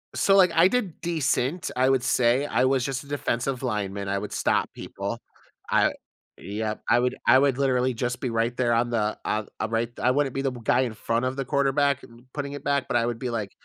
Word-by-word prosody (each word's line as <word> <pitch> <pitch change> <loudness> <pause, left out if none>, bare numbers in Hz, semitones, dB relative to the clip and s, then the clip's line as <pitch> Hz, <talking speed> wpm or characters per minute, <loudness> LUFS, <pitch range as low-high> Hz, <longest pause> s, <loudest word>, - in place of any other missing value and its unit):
So, 195 - +3
like, 185 -3 +6
I 165 +2 +6
did 200 -6 -2
decent, 165 -1 -1
I 130 +1 +3
would 135 -1 +3
say, 125 +1 +2
I - - +2
was 130 -1 +2
just 135 0 -3
a - - -16
defensive 135 -2 -2
lineman, 100 -5 -3
I 100 0 0
would - - -5
stop - - +1
people. - - -5 0.5
I - - +3 0.4
yep, 105 +1 -4
I 120 - +5
would 125 +1 0
I 120 +2 +7
would 135 -2 +3
literally 130 -2 +2
just 125 +1 -3
be 125 - -3
right 115 +1 0
there 120 -2 +2
on 120 +1 +1
the 110 -3 -1
on 105 0 -2 0.2
right 115 +1 0
I 125 - +3
wouldn't 140 -1 0
be 135 - -2
the 135 -1 0
b 120 -2 -9
guy 120 - +3
in 125 -4 -2
front 115 +3 -1
of 130 +1 -2
the 135 - -3
quarterback 140 0 +2
r - - -13 0.2
putting 140 -1 -4
it 145 -1 -7
back, 140 -1 0
but - - +1
I 115 - +1
would 120 -1 -3
be 125 - -3
like 110 -4 -3
125 Hz, 235 wpm, -25 LUFS, 115-140 Hz, 0.5 s, I